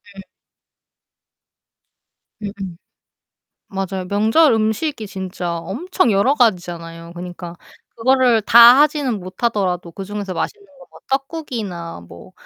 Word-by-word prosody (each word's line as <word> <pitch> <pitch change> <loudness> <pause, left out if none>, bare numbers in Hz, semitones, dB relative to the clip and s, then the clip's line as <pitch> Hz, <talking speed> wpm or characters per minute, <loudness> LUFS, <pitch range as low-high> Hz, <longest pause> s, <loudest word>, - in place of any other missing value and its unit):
네. 195 - -9 2.2
음음. 195 -4 -6 0.9
맞아요. 190 -2 -4
명절 220 - +4
음식이 220 +3 -1
진짜 185 -3 -5
엄청 240 - -1
여러 200 +8 +3
가지잖아요. 170 - -1
그니까 175 0 -8 0.4
그거를 250 -1 +3
다 235 +4 +8
하지는 290 -7 +2
못하더라도 185 -2 -2
그중에서 195 +1 -6
맛있는 405 - -4
거 285 - -24
뭐 - - -16
떡국이나 240 - -4
뭐 85 0 -13
205 Hz, 245 characters per minute, -19 LUFS, 180-250 Hz, 2.2 s, 다